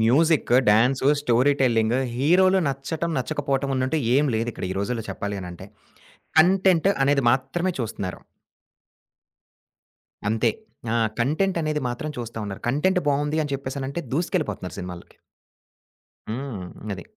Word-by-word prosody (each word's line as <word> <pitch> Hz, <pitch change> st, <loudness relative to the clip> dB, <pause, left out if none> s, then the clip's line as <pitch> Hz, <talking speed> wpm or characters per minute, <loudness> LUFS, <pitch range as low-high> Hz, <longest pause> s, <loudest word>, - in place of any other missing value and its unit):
Music, 145 Hz, +8 st, +3 dB, 0.2 s
dance, 125 Hz, +6 st, +4 dB
story 130 Hz, 0 st, +3 dB
telling, 115 Hz, -2 st, +3 dB, 0.2 s
హీరోలు 180 Hz, +9 st, +4 dB
నచ్చడం, 150 Hz, +5 st, -3 dB
నచ్చకపోవటమన్నట్టు 135 Hz, 0 st, -1 dB, 0.2 s
ఏమి 140 Hz, -1 st, +3 dB
లేదిక్కడ 115 Hz, -3 st, -3 dB
ఈ -, -, -6 dB
రోజుల్లో 115 Hz, +2 st, -2 dB
చెప్పాలని 100 Hz, -3 st, -4 dB
అంటే, 90 Hz, +2 st, -10 dB, 0.7 s
కంటెంట్ 185 Hz, +1 st, +4 dB
అనేది 140 Hz, 0 st, +3 dB
మాత్రమే 135 Hz, +8 st, 0 dB
చూస్తున్నారు. 100 Hz, -6 st, -4 dB, 2.1 s
అంతే. 110 Hz, +1 st, +2 dB, 0.4 s
ఆ! -, -, +1 dB, 0.2 s
కంటెంటనేది 155 Hz, +2 st, 0 dB
మాత్రం 120 Hz, +5 st, -4 dB
చూస్తా 115 Hz, -2 st, -6 dB
ఉన్నారు. 100 Hz, -1 st, -7 dB
కంటెంట్ 180 Hz, +9 st, +2 dB
బావుంది 145 Hz, +2 st, +1 dB
అని 145 Hz, -, -5 dB
చెప్పేసనంటే 135 Hz, +3 st, -4 dB
దూసుకెళ్ళిపోతున్నారు 155 Hz, -, -2 dB
సినిమాలకి. 90 Hz, -1 st, -8 dB, 1.1 s
హ్మ్. 115 Hz, -3 st, -5 dB, 0.3 s
అది. -, -, -9 dB
135 Hz, 110 wpm, -24 LUFS, 115-155 Hz, 2.1 s, dance